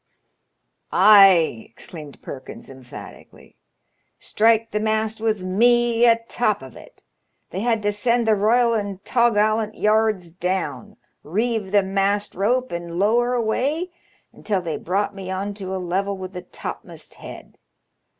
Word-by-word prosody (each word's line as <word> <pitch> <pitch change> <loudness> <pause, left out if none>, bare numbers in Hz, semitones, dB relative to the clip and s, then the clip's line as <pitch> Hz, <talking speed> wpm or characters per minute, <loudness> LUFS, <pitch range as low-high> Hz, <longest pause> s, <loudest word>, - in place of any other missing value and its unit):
"Ay," 190 - +6
exclaimed 150 +4 -12
Perkins 130 0 -9
emphatically, 130 -2 -13 0.6
"strike 225 +1 +1
the 210 - -1
mast 220 0 -1
with 215 -4 -1
me 240 +4 +3
atop 230 - +1
of 130 -3 -12
it. - - -16 0.5
They 185 - -4
had 225 0 0
to 205 - +1
send 235 +2 0
the 220 - +5
royal 230 +3 +3
and 200 -3 -3
tawgallant 215 -2 +1
yards 215 -5 +1
down, 175 -8 -4 0.3
reeve 215 +4 -2
the 205 -1 +4
mast 195 +1 -1
rope, 250 +7 0
and 170 0 -5
lower 240 +5 +2
away 275 +10 -1 0.4
until 205 -3 -2
they 170 -3 -4
brought 200 +4 -2
me 195 -2 -8
on 195 +2 -3
to 190 -2 -6
a - - -2
level 190 +2 -2
with 185 0 -8
the 180 - -6
topm'st - - -9
head. - - -11
205 Hz, 135 wpm, -22 LUFS, 185-225 Hz, 0.6 s, Ay